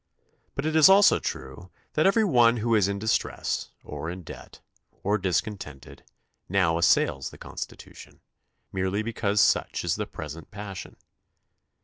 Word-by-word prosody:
But 140 Hz, -, -3 dB
it 155 Hz, 0 st, -1 dB
is 160 Hz, +2 st, +8 dB
also 195 Hz, +1 st, +6 dB
true 90 Hz, +1 st, -6 dB, 0.2 s
that 155 Hz, +4 st, +3 dB
every 220 Hz, +3 st, +4 dB
one 120 Hz, -, +4 dB
who 115 Hz, +1 st, 0 dB
is 105 Hz, -4 st, +4 dB
in 100 Hz, 0 st, -2 dB
distress, 110 Hz, +2 st, -1 dB
or 75 Hz, +2 st, -6 dB
in 90 Hz, +1 st, -7 dB
debt, -, -, -11 dB, 0.4 s
or 105 Hz, +2 st, +1 dB
discon 95 Hz, +3 st, -1 dB
tented, 70 Hz, -5 st, -11 dB, 0.5 s
now 90 Hz, -3 st, +2 dB
assails 70 Hz, -5 st, +2 dB
the -, -, -14 dB
Constitution, -, -, -9 dB, 0.5 s
merely 95 Hz, +2 st, -1 dB
because 105 Hz, -2 st, -1 dB
such -, -, +2 dB
is -, -, 0 dB
the -, -, -3 dB
present 80 Hz, +1 st, -8 dB
passion. 100 Hz, -2 st, -8 dB
100 Hz, 145 wpm, -26 LUFS, 90-115 Hz, 0.5 s, is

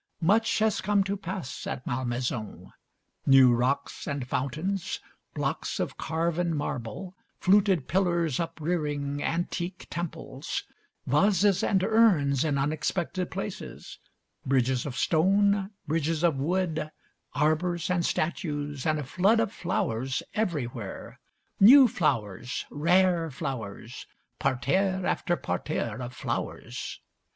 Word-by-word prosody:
Much 215 Hz, +7 st, +3 dB
has 220 Hz, -1 st, +2 dB
come 205 Hz, 0 st, +2 dB
to 195 Hz, +1 st, -2 dB
pass 190 Hz, -7 st, -6 dB
at 130 Hz, -, -4 dB
Malmaison. 120 Hz, -3 st, -3 dB, 0.5 s
New 135 Hz, -2 st, +7 dB
rocks 125 Hz, +4 st, -1 dB
and 140 Hz, -3 st, -3 dB
fountains, 155 Hz, +9 st, -2 dB, 0.4 s
blocks -, -, -2 dB
of -, -, -2 dB
carven 170 Hz, +1 st, -1 dB
marble, 145 Hz, -, -4 dB, 0.2 s
fluted 190 Hz, -6 st, +3 dB
pillars 170 Hz, -4 st, +1 dB
uprearing 150 Hz, -4 st, -2 dB
antique 175 Hz, +3 st, -2 dB
temples, 170 Hz, -1 st, -4 dB, 0.4 s
vases 195 Hz, +6 st, +3 dB
and 190 Hz, -2 st, +2 dB
urns 185 Hz, -, +4 dB
in 150 Hz, -3 st, 0 dB
unexpected 165 Hz, +5 st, -1 dB
places, -, -, -7 dB, 0.4 s
bridges 130 Hz, -1 st, +1 dB
of 130 Hz, -, -5 dB
stone, 195 Hz, +4 st, +3 dB, 0.2 s
bridges 160 Hz, +1 st, 0 dB
of 170 Hz, -4 st, +4 dB
wood, 160 Hz, 0 st, -1 dB, 0.5 s
arbours 155 Hz, +4 st, +1 dB
and 175 Hz, -1 st, +1 dB
statues, 145 Hz, -6 st, -2 dB
and 155 Hz, 0 st, +2 dB
a 150 Hz, -, -3 dB
flood 195 Hz, -, +3 dB
of 225 Hz, -1 st, 0 dB
flowers 130 Hz, -, -1 dB
everywhere, 130 Hz, -, -3 dB, 0.4 s
new 255 Hz, +6 st, +9 dB
flowers, 120 Hz, -, -1 dB
rare 170 Hz, +2 st, +3 dB
flowers, 120 Hz, -4 st, -6 dB, 0.3 s
parterre 185 Hz, +9 st, +1 dB
after 175 Hz, -, 0 dB
parterre 115 Hz, -, -3 dB
of 120 Hz, 0 st, -5 dB
flowers. -, -, -4 dB
160 Hz, 110 wpm, -28 LUFS, 135-185 Hz, 0.5 s, new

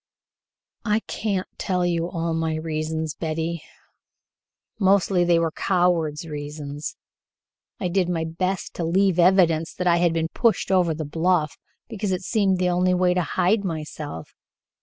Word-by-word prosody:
"I 215 Hz, -1 st, +1 dB
can't 200 Hz, -5 st, -2 dB
tell 180 Hz, -2 st, 0 dB
you 170 Hz, -1 st, 0 dB
all 165 Hz, -1 st, -2 dB
my 160 Hz, -1 st, -1 dB
reasons, 155 Hz, 0 st, -3 dB
Betty; 165 Hz, 0 st, -3 dB, 1.2 s
mostly 190 Hz, -2 st, +3 dB
they 175 Hz, -1 st, +4 dB
were 165 Hz, -1 st, +1 dB
coward's 170 Hz, -4 st, +1 dB
reasons. 145 Hz, -1 st, -6 dB, 0.8 s
I 185 Hz, -, -1 dB
did 180 Hz, 0 st, +1 dB
my 165 Hz, -2 st, -1 dB
best 185 Hz, +3 st, -3 dB
to 175 Hz, -, -2 dB
leave 185 Hz, +2 st, +2 dB
evidence 170 Hz, -3 st, +4 dB
that 180 Hz, -, -3 dB
I 175 Hz, -1 st, +4 dB
had 170 Hz, -1 st, +2 dB
been 165 Hz, 0 st, -1 dB
pushed 230 Hz, 0 st, +1 dB
over 180 Hz, -4 st, +3 dB
the 155 Hz, 0 st, -4 dB
bluff, 160 Hz, 0 st, +1 dB, 0.3 s
because 210 Hz, -3 st, -3 dB
it 185 Hz, 0 st, -2 dB
seemed 195 Hz, -3 st, +1 dB
the 180 Hz, 0 st, +1 dB
only 180 Hz, +1 st, +2 dB
way 180 Hz, 0 st, +3 dB
to 180 Hz, -, +1 dB
hide 185 Hz, +6 st, +1 dB
myself. 155 Hz, -, -6 dB
175 Hz, 150 wpm, -24 LUFS, 160-185 Hz, 1.2 s, they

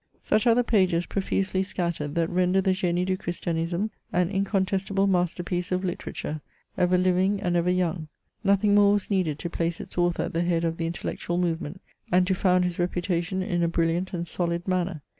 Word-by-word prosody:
Sudiare 230 Hz, +1 st, +3 dB
the 245 Hz, -, +3 dB
pages, 185 Hz, -7 st, +2 dB
profusely 190 Hz, -1 st, -1 dB
scattereid, 170 Hz, -6 st, -3 dB
that 165 Hz, -1 st, +2 dB
render 180 Hz, +2 st, +2 dB
the 190 Hz, 0 st, +2 dB
G^Ue 180 Hz, -1 st, 0 dB
du 185 Hz, 0 st, 0 dB
Christiamtme 175 Hz, +3 st, -2 dB, 0.2 s
an 180 Hz, +1 st, +1 dB
incontestable 195 Hz, 0 st, 0 dB
masterpiece 175 Hz, -1 st, 0 dB
of 185 Hz, 0 st, +1 dB
literar 180 Hz, -2 st, -4 dB
ture, 150 Hz, 0 st, -4 dB, 0.3 s
ever 180 Hz, 0 st, +3 dB
living 185 Hz, +2 st, +2 dB
9nd 180 Hz, -3 st, -1 dB
ever 175 Hz, +1 st, +2 dB
young. 175 Hz, -3 st, 0 dB, 0.4 s
Nothing 200 Hz, +1 st, +3 dB
more 205 Hz, 0 st, +6 dB
was 205 Hz, 0 st, -1 dB
needed 180 Hz, -7 st, +1 dB
to 170 Hz, -, -4 dB
place 170 Hz, -1 st, -1 dB
its 190 Hz, -2 st, -6 dB
author 175 Hz, 0 st, +1 dB
at -, -, -5 dB
the 165 Hz, -, +1 dB
head 170 Hz, -1 st, +1 dB
of 165 Hz, 0 st, -1 dB
the 165 Hz, -, -2 dB
intellectual 175 Hz, 0 st, -3 dB
movement, 170 Hz, 0 st, -2 dB, 0.3 s
and 180 Hz, +1 st, +4 dB
to 190 Hz, -, +1 dB
found 180 Hz, -1 st, +3 dB
his 180 Hz, -1 st, -2 dB
reputation 175 Hz, +1 st, -1 dB
in 175 Hz, -2 st, -1 dB
a 170 Hz, -, +3 dB
brilliant 170 Hz, +2 st, 0 dB
and 175 Hz, -1 st, -3 dB
solid 170 Hz, +1 st, -2 dB
manner. 180 Hz, -4 st, -1 dB
180 Hz, 190 wpm, -26 LUFS, 170-190 Hz, 0.4 s, more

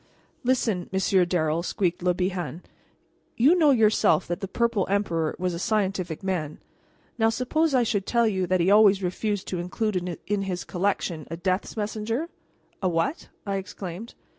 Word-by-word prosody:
"Listen, 230 Hz, -8 st, 0 dB
Monsieur 190 Hz, -1 st, +3 dB
Darrel," 165 Hz, -2 st, 0 dB
squeaked 180 Hz, 0 st, -1 dB
Le 180 Hz, 0 st, +1 dB
Bihan; 180 Hz, -2 st, -3 dB, 0.7 s
"you 270 Hz, +8 st, +6 dB
know 325 Hz, -5 st, +4 dB
yourself 220 Hz, -7 st, +4 dB
that 175 Hz, -, -3 dB
the 195 Hz, -, -4 dB
Purple 230 Hz, -1 st, 0 dB
Emperor 170 Hz, -6 st, 0 dB
was 180 Hz, -1 st, -1 dB
a 170 Hz, -, -4 dB
scientific 190 Hz, -5 st, -1 dB
man. 170 Hz, -6 st, -2 dB, 0.6 s
Now 225 Hz, 0 st, +4 dB
suppose 275 Hz, +6 st, +1 dB
I 250 Hz, -, +4 dB
should 205 Hz, -3 st, -1 dB
tell 235 Hz, -1 st, +3 dB
you 190 Hz, -4 st, 0 dB
that 185 Hz, +1 st, +2 dB
he 180 Hz, +3 st, +3 dB
always 205 Hz, -2 st, +6 dB
refused 200 Hz, +2 st, -2 dB
to 180 Hz, -, -2 dB
include 180 Hz, -1 st, -2 dB
in 205 Hz, -1 st, 0 dB
his 185 Hz, -2 st, -3 dB
collection 180 Hz, -4 st, -2 dB
a 165 Hz, -, -5 dB
Death's 185 Hz, +5 st, -2 dB
Messenger?" 220 Hz, +8 st, -2 dB, 0.5 s
"A 185 Hz, -, +1 dB
what?" 165 Hz, -, -1 dB, 0.2 s
I 200 Hz, -1 st, -1 dB
exclaimed. 190 Hz, +2 st, -7 dB
190 Hz, 165 wpm, -25 LUFS, 180-220 Hz, 0.7 s, you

